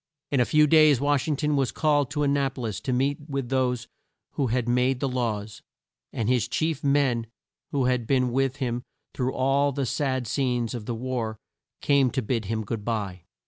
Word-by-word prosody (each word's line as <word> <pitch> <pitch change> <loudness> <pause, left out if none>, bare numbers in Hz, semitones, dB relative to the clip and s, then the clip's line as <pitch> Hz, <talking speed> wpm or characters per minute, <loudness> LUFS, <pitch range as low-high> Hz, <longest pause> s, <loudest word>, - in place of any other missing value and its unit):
In 140 - +2
a 125 - +4
few 150 +2 +4
days 155 -3 +6
Wash 145 0 +1
ing 155 - +1
ton 150 +1 0
was 135 -5 +1
called 145 -3 +1
to 150 0 -1
An 140 -1 +2
na 140 -1 +1
po 130 -1 -9
lis 110 -4 -3
to 130 - -3
meet 135 +3 +1
with 135 -3 -3
those 125 -3 0 0.4
who 135 - -1 0.2
made 125 +1 +1
the 140 - 0
laws, 110 -5 -3 0.5
and 110 - -2
his 125 -2 +2
chief 160 -2 -1
men 135 -5 +2 0.4
who 140 -3 +1
had 125 -2 0
been 125 -1 +2
with 135 +1 +1
him 125 -3 -2 0.3
through 130 0 -1
all 140 +2 +2
the 140 0 -2
sad 130 -1 -1
scenes 125 -1 -1
of 115 -4 -6
the 120 - -2
war, 115 -2 -3 0.4
came 140 -3 +3
to 130 0 -2
bid 115 -1 -1
him 110 +2 -2
good 105 0 -4
bye. 100 -6 -3
130 Hz, 200 wpm, -26 LUFS, 120-140 Hz, 0.5 s, days